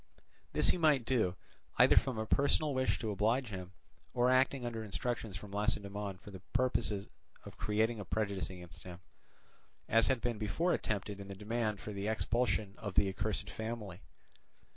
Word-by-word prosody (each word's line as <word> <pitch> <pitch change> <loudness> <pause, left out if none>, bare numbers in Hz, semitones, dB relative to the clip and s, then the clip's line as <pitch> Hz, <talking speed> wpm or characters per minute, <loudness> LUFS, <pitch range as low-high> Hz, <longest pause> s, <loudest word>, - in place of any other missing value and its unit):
This - - +4
he - - +2
might 150 -7 +4
do, 110 -9 +2 0.4
either - - +7
from 130 -4 +3
a 110 - -1
personal 140 +4 +2
wish 130 0 +1
to 110 -3 -2
oblige 115 +5 +1
him, 95 -2 -6 0.4
or 125 +1 +4
acting 130 0 +3
under 115 -2 -3
instructions 110 -1 -3
from 105 0 -10
Lacedaemon 100 -1 -1
for 100 - -12
the 95 - -8
purpose 125 -2 +2
of 100 -2 -9
creating 110 +2 +1
a 100 - -5
prejudice 100 -3 -1
against 90 -2 -10
him, 90 -1 -9 0.9
as 115 0 +4
had 130 -2 +2
been 120 -2 -2
before 115 - +1
attempted 105 -1 -2
in 100 - -7
the 100 - -7
demand 110 0 -1
for 105 - -6
the 100 +1 -3
expulsion 110 -2 +1
of 105 -4 -5
the 100 - +4
accursed 100 +1 -2
family. 110 -5 -5
110 Hz, 170 wpm, -34 LUFS, 100-120 Hz, 0.9 s, either